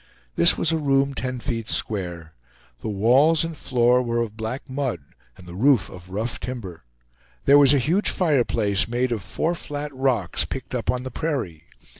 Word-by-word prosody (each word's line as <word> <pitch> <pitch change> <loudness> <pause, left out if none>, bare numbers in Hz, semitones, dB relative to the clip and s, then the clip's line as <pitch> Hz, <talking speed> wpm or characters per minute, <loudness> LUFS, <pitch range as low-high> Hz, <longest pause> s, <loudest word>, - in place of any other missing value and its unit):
This 85 - +5
was 165 - +1
a 160 - 0
room 140 -1 +1
ten 130 -1 -3
feet 115 -3 -4
square. 85 -6 -2 0.5
The - - -6
walls 130 +11 +3
and 165 -1 -6
floor 125 -2 +2
were 120 -1 -2
of 115 -3 -3
black 110 +6 -5
mud, 130 - -3 0.4
and 90 - -14
the 85 - -10
roof 120 +2 +2
of 90 0 -12
rough 110 +6 -3
timber; 95 - -7 0.6
there 145 +1 +7
was 140 -2 +6
a - - +4
huge 165 - +2
fireplace 120 - +1
made 120 +2 -1
of 115 -4 -2
four 160 - -2
flat 145 -3 -6
rocks, 130 -8 0
picked - - -7
up - - -3
on 125 0 0
the 130 - -6
prairie. 115 - -3
125 Hz, 180 wpm, -23 LUFS, 105-140 Hz, 0.6 s, there